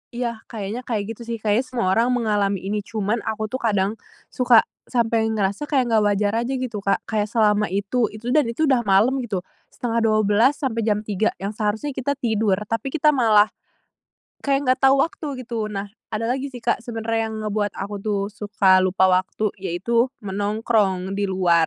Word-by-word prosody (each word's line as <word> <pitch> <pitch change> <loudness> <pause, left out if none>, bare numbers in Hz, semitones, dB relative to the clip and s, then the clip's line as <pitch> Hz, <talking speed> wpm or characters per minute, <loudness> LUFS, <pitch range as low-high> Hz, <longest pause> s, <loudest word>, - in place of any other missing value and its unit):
Iya, 235 -2 -3
kayaknya 215 +1 -5
kayak 220 -4 -1
gitu, 235 - -15
sih. 235 - -2
Kayaknya 220 +4 +2
semua 240 -7 -1
orang 230 +5 +3
mengalami 205 -5 0
ini. 205 +2 -1
Cuman, 215 +2 -2
aku 220 0 -2
tuh 260 - -2
kadang, 205 -4 +1 0.4
suka 245 -3 +5 0.2
sampai 230 -2 +1
ngerasa 210 +4 -1
kayak 260 -5 +1
nggak 220 -1 +4
wajar 205 0 +1
aja, 265 - -2
gitu, 250 -5 -3
Kak. 195 0 0
Kayak 215 -2 -1
selama 210 -2 +2
itu 200 +5 0
itu 235 +3 -4
dan 295 -2 +3
itu 235 +7 -1
udah 265 -5 +3
malem, 215 +8 +4
gitu. 190 -5 -3 0.2
11.30 225 +1 +2
sampe 260 -6 -2
jam 210 -1 0
3, 210 0 0 0.2
yang 200 - -2
seharusnya 220 +6 -2
kita 275 +1 -2
tidur. 220 -6 +1
Tapi 225 +4 -3
kita 300 +2 +3
malah, 220 -6 +4 0.9
kayak 275 -2 +1
nggak 255 - +3
tahu 270 - +6
waktu, 320 0 -4 0.2
gitu. 230 -3 -3
Nah, 200 -1 -5 0.2
ada 225 +2 -1
lagi 265 +2 -1
sih, 250 -4 -9
Kak, 235 - +1
sebenernya 225 -1 -2
yang 220 - -6
ngebuat 210 -1 -1
aku 200 +2 -5
tuh, 205 0 -1
suka 205 -3 +3
lupa 185 0 +3
waktu. 185 +3 +1
Yaitu, 195 +7 0 0.2
menongkrong 205 -1 0
di 205 - +1
luar. 175 -4 +3
220 Hz, 180 wpm, -22 LUFS, 205-240 Hz, 0.9 s, tahu